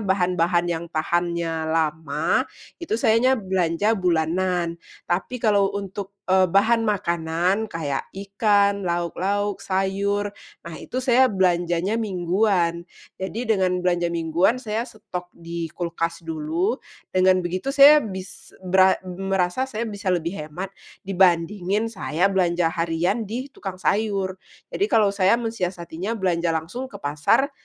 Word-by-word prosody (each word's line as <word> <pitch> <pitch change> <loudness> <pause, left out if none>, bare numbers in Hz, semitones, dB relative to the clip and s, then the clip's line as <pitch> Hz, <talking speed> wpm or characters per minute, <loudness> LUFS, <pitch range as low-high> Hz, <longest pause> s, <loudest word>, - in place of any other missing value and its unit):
bahan-bahan 180 -3 +1
yang 165 0 -2
tahannya 170 0 -1
lama, 160 -1 0 0.3
itu 340 - -2
sayanya 235 +4 +3
belanja 190 0 0
bulanan. 175 0 0 0.3
Tapi 190 +8 -2
kalau 205 -4 +3
untuk, 200 0 -6
eee, 185 -1 +5
bahan 220 +6 +3
makanan 175 +2 0
kayak 145 -6 -3
ikan, 200 0 +2
lauk-lauk, 190 +4 -1
sayur, 200 +2 -1 0.3
nah 170 - -8
itu 255 - -8
saya 255 +1 +5
belanjanya 180 +1 +1
mingguan. 180 -3 0 0.3
Jadi 195 +6 -3
dengan 180 -2 0
belanja 175 -1 +1
mingguan 170 +6 +1
saya 230 0 -3
stok 180 -4 -8
di 170 0 -5
kulkas 170 0 -3
dulu, 165 +8 -1 0.3
dengan 185 0 +3
begitu 185 +8 -3
saya 285 +2 +8
bis 190 -5 -8
beram 190 +1 +5 0.3
merasa 195 +7 0
saya 230 -1 -3
bisa 205 -2 -5
lebih 175 -1 0
hemat 175 +6 -6 0.3
dibandingin 190 +2 +2
saya 195 -1 0
belanja 175 -3 +1
harian 175 +6 -1
di 255 +5 -5
tukang 190 -2 -6
sayur. 195 0 -1 0.3
Jadi 405 - 0
kalau 220 - +3
saya 200 +1 +3
mensiasatinya 190 -4 -3
belanja 175 -5 0
langsung 175 +12 -4
ke 255 - -18
pasar, 150 - +2
185 Hz, 125 wpm, -23 LUFS, 170-205 Hz, 0.3 s, saya